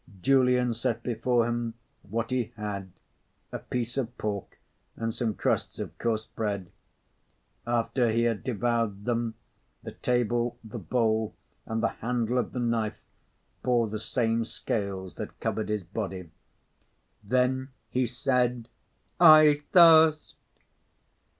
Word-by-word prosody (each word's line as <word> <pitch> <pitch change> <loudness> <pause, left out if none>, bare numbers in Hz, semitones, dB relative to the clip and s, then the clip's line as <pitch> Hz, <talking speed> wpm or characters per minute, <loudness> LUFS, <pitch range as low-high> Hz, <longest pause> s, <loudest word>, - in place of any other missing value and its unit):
Julian 125 -2 +3
set 115 0 -2
before 120 0 +1
him 120 -1 -2 0.3
what 115 +3 -4
he 125 -2 +1
had, 100 -3 -5 0.6
a - - -4
piece 120 0 -4
of 120 -1 -4
pork 100 -2 -4 0.4
and 115 0 -3
some 110 -3 -1
crusts - - -1
of - - -6
coarse 110 -2 -1
bread. 100 -6 -4 1.0
After 120 +1 +1
he 115 +1 +1
had 115 -3 0
devoured 115 -3 -1
them, 115 -2 -1 0.5
the - - -6
table, 120 -1 0
the 110 +1 -7
bowl, 110 +1 0 0.3
and 110 +1 -2
the - - +3
handle 120 +1 0
of - - -2
the 125 - -4
knife 115 -3 -1 0.6
bore 120 -2 +2
the 110 0 -4
same 115 0 0
scales 100 -4 -4
that - - -7
covered 110 -1 -2
his 105 -2 -1
body. 95 -2 -5 0.9
Then 130 +4 +1 0.2
he 125 -1 +1
said: 125 -1 0 0.5
"I 155 -3 +8
thirst!" 160 -3 +6
115 Hz, 125 wpm, -28 LUFS, 110-125 Hz, 1.0 s, I